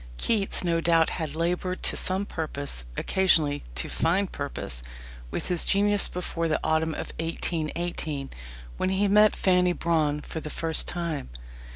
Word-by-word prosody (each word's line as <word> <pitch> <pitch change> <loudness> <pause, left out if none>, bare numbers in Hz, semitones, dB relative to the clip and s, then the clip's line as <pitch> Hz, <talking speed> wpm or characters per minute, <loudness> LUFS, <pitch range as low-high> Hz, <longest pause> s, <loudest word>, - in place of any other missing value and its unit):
Keats 205 - +3
no 170 -1 +1
doubt 165 -1 +3
had 155 -3 -3
laboured 180 +2 -1
to - - +1
some 190 +2 0
purpose 140 - -4
occasionally, 160 -7 +3
to 65 - +1
fine 180 +5 +2
purpose 140 - -5 0.5
with - - -4
his 175 -2 +2
genius 205 0 +4
before 170 -2 -3
the 155 - +1
autumn 160 0 +1
of - - -6
1818, 165 -3 -2 0.5
when 185 - 0
he 190 +2 +2
met 210 +1 +5
Fanny 180 -1 +3
Brawne 155 -3 +1
for 160 - -6
the 155 - -7
first 160 +1 -1
time. 170 - -3
165 Hz, 150 wpm, -26 LUFS, 155-185 Hz, 0.5 s, met